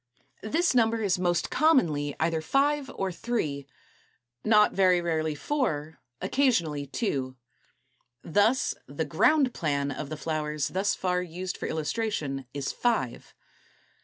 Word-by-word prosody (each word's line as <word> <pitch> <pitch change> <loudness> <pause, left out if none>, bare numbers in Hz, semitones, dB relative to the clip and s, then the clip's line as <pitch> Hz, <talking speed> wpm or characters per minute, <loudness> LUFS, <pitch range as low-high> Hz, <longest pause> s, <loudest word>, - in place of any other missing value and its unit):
This 325 - +1
number 225 -2 +2
is 185 -3 +1
most 175 -1 0
commonly 155 - +2
either 160 0 +1
five 280 - +1
or 190 -1 -2
three, 170 - -3 0.8
not 210 -1 +5
very 185 -2 +4
rarely 160 -3 -1
four, 160 - -2 0.2
occasionally 170 - +1
two. 135 - -2 0.9
Thus 205 +9 +2
the - - -3
ground 290 -5 +3
plan 145 -3 -1
of 140 +1 -5
the 155 - -5
flowers 150 -1 -2
thus 195 +2 0
far 180 -1 0
used 180 +1 -5
for - - -5
illustration 150 - -2
is 140 -1 -3
five. 230 - -1
175 Hz, 125 wpm, -27 LUFS, 150-225 Hz, 0.9 s, not